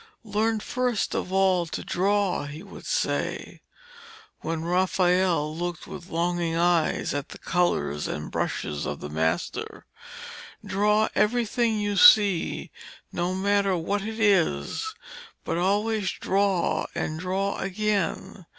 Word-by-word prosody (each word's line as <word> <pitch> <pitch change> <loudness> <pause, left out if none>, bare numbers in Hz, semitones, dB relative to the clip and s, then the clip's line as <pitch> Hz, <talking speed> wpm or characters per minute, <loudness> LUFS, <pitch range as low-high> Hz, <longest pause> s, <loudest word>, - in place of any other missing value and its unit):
'Learn 220 +1 0
first 250 0 -1
of 180 - -3
all 190 -2 +3
to - - -5
draw,' 195 -3 +1
he 150 +4 -8
would 200 - -11
say, - - -2 0.8
when 160 0 -3
Raphael 180 -3 +2
looked 175 0 -4
with 180 0 -9
longing 170 0 -1
eyes 170 -1 +1
at 145 0 -3
the - - -9
colours 75 - 0
and - - -5
brushes 75 -1 -2
of 75 - -4
the 75 - -7
master. 80 +1 -2 0.8
'Draw 210 +2 +2
everything 230 0 +1
you 205 -1 -1
see, 200 -3 +5 0.4
no 175 +1 -1
matter 200 -1 +2
what 195 +5 -1
it 220 +2 -5
is, 195 - +1 0.5
but 170 - -2
always 205 +2 +1
draw 195 -2 0
and 155 0 -3
draw 190 +3 -1
again. 195 -2 -2
190 Hz, 125 wpm, -26 LUFS, 170-205 Hz, 0.8 s, see